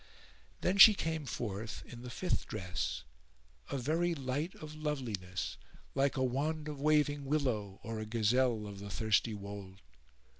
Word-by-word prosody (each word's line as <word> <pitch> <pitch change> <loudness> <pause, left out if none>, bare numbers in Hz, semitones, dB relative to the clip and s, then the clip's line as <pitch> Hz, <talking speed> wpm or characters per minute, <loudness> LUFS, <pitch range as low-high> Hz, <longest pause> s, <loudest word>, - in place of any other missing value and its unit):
Then 190 +2 +1
she 215 +2 +12
came 160 -4 -2
forth 110 -1 -4
in 120 0 -10
the 125 - -7
fifth 180 +9 -1
dress, 90 -2 -3 0.7
a - - -1
very 165 +6 +1
light 140 +5 -2
of 155 -1 -9
loveliness 120 -12 -3 0.4
like 140 0 +2
a 130 - +2
wand 150 +5 -1
of 145 -2 -5
waving 145 -1 +3
willow 125 -9 0
or 115 -1 -4
a 110 - -3
gazelle 115 +1 +2
of 100 -1 -7
the 100 +1 -7
thirsty 110 +1 +2
wold. 100 -1 -8
130 Hz, 150 wpm, -34 LUFS, 105-150 Hz, 0.7 s, she